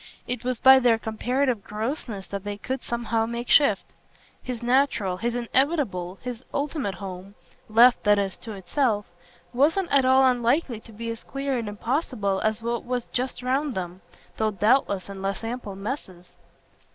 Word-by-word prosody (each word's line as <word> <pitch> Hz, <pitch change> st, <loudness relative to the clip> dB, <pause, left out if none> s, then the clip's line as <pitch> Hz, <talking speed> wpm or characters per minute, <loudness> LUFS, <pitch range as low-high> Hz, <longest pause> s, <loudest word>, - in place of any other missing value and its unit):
It 250 Hz, -1 st, -2 dB
was 250 Hz, -2 st, -2 dB
by 265 Hz, 0 st, +8 dB
their 240 Hz, -3 st, +4 dB
comparative 240 Hz, +1 st, -1 dB
grossness 215 Hz, -2 st, -4 dB
that 200 Hz, -1 st, -6 dB
they 205 Hz, 0 st, -4 dB
could 260 Hz, +4 st, -4 dB
somehow 230 Hz, -1 st, -1 dB
make 235 Hz, +1 st, -4 dB
shift. 285 Hz, -1 st, +5 dB, 0.6 s
His 245 Hz, -2 st, -5 dB
natural, 240 Hz, -7 st, +2 dB
his 235 Hz, +4 st, -2 dB
inevitable, 240 Hz, -, 0 dB
his 250 Hz, -1 st, -5 dB
ultimate 280 Hz, -, -2 dB
home 190 Hz, +1 st, -8 dB, 0.3 s
left, 235 Hz, +3 st, +6 dB
that 205 Hz, 0 st, +5 dB
is, 195 Hz, -2 st, -1 dB
to 225 Hz, -, -7 dB
itself 205 Hz, +3 st, 0 dB, 0.5 s
wasn't 325 Hz, +8 st, +2 dB
at 275 Hz, -1 st, +5 dB
all 260 Hz, +1 st, +5 dB
unlikely 245 Hz, 0 st, +2 dB
to 225 Hz, -, -15 dB
be 230 Hz, +2 st, -5 dB
as 230 Hz, -, -7 dB
queer 275 Hz, 0 st, -3 dB
and 230 Hz, -3 st, -2 dB
impossible 210 Hz, -3 st, -1 dB
as 215 Hz, +1 st, 0 dB
what 235 Hz, 0 st, -2 dB
was 245 Hz, -1 st, -2 dB
just 250 Hz, 0 st, -2 dB
round 270 Hz, +2 st, 0 dB
them, 180 Hz, 0 st, -5 dB, 0.4 s
though 220 Hz, 0 st, +1 dB
doubtless 210 Hz, -1 st, +2 dB
in 195 Hz, -1 st, -8 dB
less 195 Hz, +2 st, -3 dB
ample 225 Hz, -3 st, -5 dB
masses. 195 Hz, -4 st, -6 dB
235 Hz, 165 wpm, -25 LUFS, 205-260 Hz, 0.6 s, by